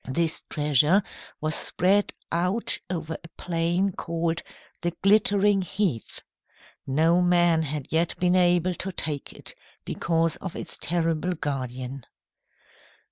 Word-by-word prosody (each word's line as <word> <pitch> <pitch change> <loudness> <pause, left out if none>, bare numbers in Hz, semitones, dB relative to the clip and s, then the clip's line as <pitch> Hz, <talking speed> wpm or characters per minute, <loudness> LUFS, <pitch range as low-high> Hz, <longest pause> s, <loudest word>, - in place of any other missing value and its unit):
This 160 +4 0
treasure 150 +6 +3 0.4
was 155 0 0
spread 195 +6 +2 0.2
out 185 +7 +2
over 165 -3 -4
a - - -9
plain 175 +3 0
called 170 -1 -2 0.4
the 175 -1 -1
Glittering 205 0 +4
Heath. 185 - -2 0.6
No 160 +6 +3
man 175 -2 +4
had 150 -2 -2
yet 165 +1 +1
been 180 0 +3
able 180 0 +3
to 190 +2 -4
take 150 -5 -3
it, - - -7 0.3
because 165 -1 0
of 190 -3 -7
its - - -4
terrible 165 +1 0
guardian. 130 -3 -4
170 Hz, 120 wpm, -26 LUFS, 155-180 Hz, 0.6 s, Glittering